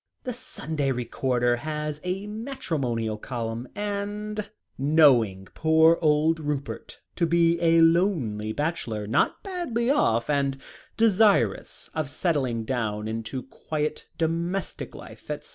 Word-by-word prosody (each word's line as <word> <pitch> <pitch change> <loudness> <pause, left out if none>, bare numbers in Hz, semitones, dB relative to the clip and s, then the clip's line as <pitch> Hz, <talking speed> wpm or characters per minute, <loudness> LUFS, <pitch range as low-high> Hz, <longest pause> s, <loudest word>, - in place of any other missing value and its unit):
"The 250 - -3
Sunday 150 - -2
Recorder 120 0 0
has 150 +2 -4
a 185 +2 -2
matrimonial 150 - -3
column 115 0 -4
and 210 +1 -3 0.3
knowing 130 -10 +4
poor 160 +1 +4
old 155 +1 +3
Rupert 145 -2 -4 0.2
to 170 - +1
be 170 0 +3
a 165 0 +5
lonely 165 - +2
bachelor, 120 -7 -2
not 110 - +1
badly 275 - -1
off, 115 - +2
and 140 -2 +1 0.4
desirous 220 -2 +3
of 155 -4 -2
settling 130 -7 0
down 110 -4 -2
into 115 +3 -4
quiet 150 +2 -4
domestic 170 +3 -2
life, - - -12
etc. - - -5
155 Hz, 115 wpm, -26 LUFS, 120-180 Hz, 0.4 s, a